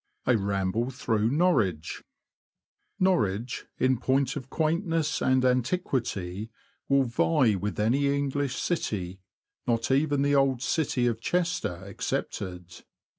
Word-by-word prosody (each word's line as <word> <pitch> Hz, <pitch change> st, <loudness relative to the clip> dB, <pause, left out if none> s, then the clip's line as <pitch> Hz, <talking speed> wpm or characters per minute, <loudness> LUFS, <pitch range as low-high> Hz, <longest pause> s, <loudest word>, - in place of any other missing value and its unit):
A 125 Hz, -, +4 dB
RAMBLE 100 Hz, +3 st, 0 dB
THROUGH 110 Hz, -4 st, 0 dB
NORWICH, 120 Hz, -, +1 dB, 1.0 s
^^p 185 Hz, -, +5 dB
ORWICH, 115 Hz, -, 0 dB
in 130 Hz, -2 st, +2 dB
point 135 Hz, +1 st, +1 dB
of 135 Hz, -2 st, -6 dB
quaintness 165 Hz, 0 st, 0 dB
and 130 Hz, 0 st, +3 dB
anti 125 Hz, +6 st, +2 dB
quity, 110 Hz, -, -3 dB, 0.4 s
will 140 Hz, 0 st, +4 dB
vie 125 Hz, 0 st, +2 dB
with 100 Hz, 0 st, -3 dB
any 130 Hz, +7 st, +2 dB
English 140 Hz, -1 st, 0 dB
city, 95 Hz, -, -2 dB, 0.5 s
not 115 Hz, +1 st, +1 dB
even 145 Hz, 0 st, +2 dB
the 145 Hz, 0 st, +2 dB
old 135 Hz, -3 st, +2 dB
city 135 Hz, -6 st, 0 dB
of 115 Hz, -2 st, 0 dB
Chester 175 Hz, -, -1 dB
excepted. 90 Hz, -2 st, -5 dB
125 Hz, 125 wpm, -27 LUFS, 105-145 Hz, 1.0 s, ^^p